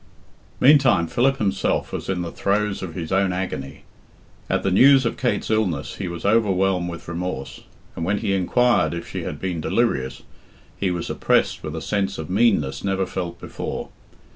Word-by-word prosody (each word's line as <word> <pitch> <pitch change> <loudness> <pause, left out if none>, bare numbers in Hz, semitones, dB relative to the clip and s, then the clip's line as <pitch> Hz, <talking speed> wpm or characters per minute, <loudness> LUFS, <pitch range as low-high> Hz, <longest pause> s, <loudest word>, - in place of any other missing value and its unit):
Meantime 135 - +5
Philip 135 +10 +1
himself 95 -4 0
was - - -4
in 90 -2 -1
the 85 - -5
throes 100 0 0
of 85 -4 -6
his 80 -3 -5
own 95 0 +2
agony. 90 -7 -4 0.7
At - - 0
the 95 - +1
news 135 +6 +6
of 115 - 0
Kate's 125 -3 -1
illness 95 -10 -1
he - - -3
was 85 0 -6
overwhelmed 95 -4 +2
with 85 -1 -8
remorse, 85 -5 -5 0.3
and 85 - -4
when 100 +5 +1
he 100 - -1
inquired 120 +3 +2
if 85 - -6
she - - -5
had - - -5
been 90 -4 -3
delirious, 75 - 0 0.5
he 95 - -1
was 90 -1 -3
oppressed - - +1
with 75 0 -5
a 80 - -5
sense 100 -1 -1
of 80 +1 -6
meanness 95 - +2
never 95 -1 0
felt 90 -2 -5
before. - - -5
95 Hz, 175 wpm, -22 LUFS, 85-105 Hz, 0.7 s, news